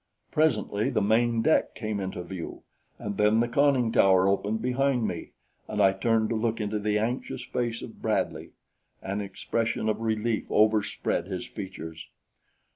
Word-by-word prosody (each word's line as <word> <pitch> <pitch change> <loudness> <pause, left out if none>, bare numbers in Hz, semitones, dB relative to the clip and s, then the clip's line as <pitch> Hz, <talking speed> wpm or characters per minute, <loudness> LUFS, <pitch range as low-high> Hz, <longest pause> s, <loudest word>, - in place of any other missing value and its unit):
Presently 115 -6 +1
the 130 - +1
main 115 +2 +2
deck 160 - +2
came 110 -3 -3
into 95 -2 -4
view, 90 -1 -7 0.3
and 100 -1 -5
then 105 +1 +4
the 120 - +2
conning 130 -2 +3
tower 95 -3 +5
opened 100 +3 +1
behind 125 0 +1
me, - - -5 0.4
and - - -4
I 95 - +5
turned 110 +2 +1
to 115 - 0
look 115 +1 0
into 105 0 -1
the 105 0 +1
anxious 120 +3 -2
face 120 -2 -2
of - - -10
Bradley. - - -1 0.5
An 100 +2 -2
expression 110 +3 -2
of 110 0 0
relief 110 0 -1
overspread 105 -4 +2
his 95 -2 -4
features. 80 -6 -8
110 Hz, 155 wpm, -27 LUFS, 100-120 Hz, 0.5 s, tower